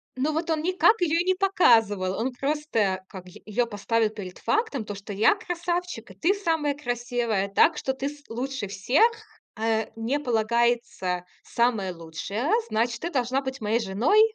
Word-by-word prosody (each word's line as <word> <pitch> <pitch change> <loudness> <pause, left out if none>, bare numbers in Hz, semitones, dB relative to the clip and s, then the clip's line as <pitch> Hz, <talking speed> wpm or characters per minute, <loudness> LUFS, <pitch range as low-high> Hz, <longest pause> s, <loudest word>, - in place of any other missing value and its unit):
Но 285 +4 0
вот 320 +2 -2
он 315 -1 +1
никак 370 +4 +3
ее 335 -1 +2
и - - -3
не 375 0 +3
показывал. 225 - +3
Он 255 +3 -1
просто, 245 -9 -1
как, 185 -3 -10
й 180 - -14
ее 230 +3 0
поставил 225 +1 0
перед 195 -4 -8
фактом, 355 - 0
то, 205 -1 -5
что 200 +1 -8
я 210 - +4
красавчик, 350 - -4
и - - -11
ты 355 +4 +2
самая 325 -7 0
красивая. 240 -6 -1
Так 300 +10 +4
что 265 - -1
ты, 270 +2 -3
с 295 0 -13
лучше 250 -1 -3
всех, 200 - +3 0.5
а 220 0 0
мне 230 +6 -1
полагается 235 -6 0 0.2
самая 220 -6 0
лучшая, 175 - -4 0.2
значит, 235 +2 0
ты 340 - -2
должна 255 -1 0
быть 265 -1 -6
моей 220 +2 +1
женой. 225 - +2
240 Hz, 170 wpm, -26 LUFS, 210-300 Hz, 0.5 s, я